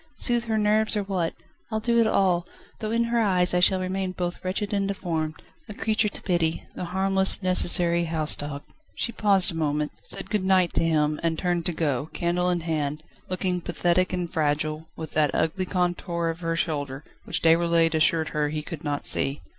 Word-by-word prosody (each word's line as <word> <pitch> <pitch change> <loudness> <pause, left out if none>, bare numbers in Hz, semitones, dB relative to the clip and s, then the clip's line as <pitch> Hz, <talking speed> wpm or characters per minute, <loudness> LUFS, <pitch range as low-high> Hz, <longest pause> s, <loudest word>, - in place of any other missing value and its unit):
Soothe 240 -1 +1
her 220 -1 0
nerves 215 +1 +2
or 205 - 0
what? 185 -4 -2 0.4
I'll 220 - 0
do 235 +1 +2
it 230 - +4
all, 180 -4 +2 0.3
though 215 - -3
in 230 +1 +1
her 235 0 0
eyes 185 -5 +3
I 180 - +3
shall 185 +1 +4
remain 185 0 -2
both 175 -1 -4
wretched 195 +3 -2
and 200 -1 +1
deformed, 165 -5 -2 0.3
a 210 - -7
creature 220 0 +1
to - - -9
pity, 170 -3 0
the - - -5
harmless, 190 +2 +3
necessary 175 -2 +3
house 160 -2 0
dog 145 0 -6 0.2
..." - - -37
She 235 - 0
paused 200 -4 +3
a - - -7
moment: 150 -1 -1
said 195 0 -6
"Good 210 -3 0
night" 185 -2 +3
to - - +1
him, 155 -2 +1
and 165 -1 0
turned 175 -1 -1
to - - 0
go, 150 -3 -1
candle 175 +1 0
in 175 -1 0
hand, 155 -2 -2 0.3
looking 180 -1 -1
pathetic 175 +1 +1
and 180 -1 -2
fragile, 155 0 -1
with 160 -1 -6
that 150 -2 +1
ugly 175 +4 0
contour 175 -2 -1
of 165 0 -3
shoulder, 145 -4 -3 0.2
which - - -2
Déroulède 165 0 +4
assured 160 0 +2
her 150 -1 -1
he 150 0 -3
could 155 0 -7
not 145 -2 -2
see. 140 +2 +1
175 Hz, 195 wpm, -25 LUFS, 160-190 Hz, 0.4 s, it